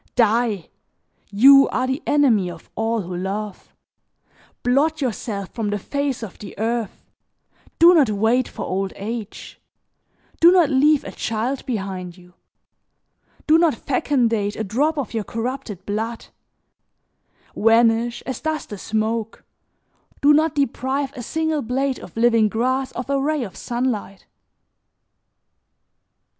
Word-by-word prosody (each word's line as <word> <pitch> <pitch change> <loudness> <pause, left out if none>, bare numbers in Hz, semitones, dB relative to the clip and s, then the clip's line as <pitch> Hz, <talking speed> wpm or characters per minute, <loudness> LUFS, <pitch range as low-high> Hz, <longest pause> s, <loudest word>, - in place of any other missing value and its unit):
Die! 225 -5 +2 0.6
You 275 +7 +7
are - - -1
the 265 +4 -2
enemy 240 -11 +3
of 175 - -12
all, 225 0 -1
who 180 -1 -6
love; 195 +2 -5 0.9
blot 290 +6 +2
yourself 215 -6 -3
from 225 -3 -2
the 205 - -1
face 280 +3 -3
of 205 - -9
the 200 - -10
earth, 225 0 -3 0.7
do 340 +2 +7
not 295 -9 +4
wait 225 +5 +1
for - - -6
old 190 +1 -2
age; 220 +1 -7 0.8
do 340 +1 +7
not 355 -5 +4
leave 285 +2 +4
a - - -7
child 235 +4 -3
behind 190 -6 -4
you, 180 0 -18 1.1
do 315 +1 +5
not 330 -6 +3
fecundate 230 -6 0
a 220 - -3
drop 280 +10 0
of 270 -6 -3
your 225 -2 -1
corrupted 230 -3 -5
blood; 225 +3 -3 1.3
vanish 230 +1 +3
as 260 -3 -5
does 315 0 -2
the 205 - -9
smoke, 220 +1 -2 0.8
do 290 +1 +5
not 310 +1 +2
deprive 275 0 -1
a 250 - -6
single 315 +4 -1
blade 265 +3 -1
of - - -12
living 230 -2 +4
grass 255 +4 -1
of 250 - -5
a 280 0 0
ray 300 -1 0
of 195 -6 -8
sunlight!'" 235 -5 -3
235 Hz, 130 wpm, -21 LUFS, 215-275 Hz, 1.3 s, You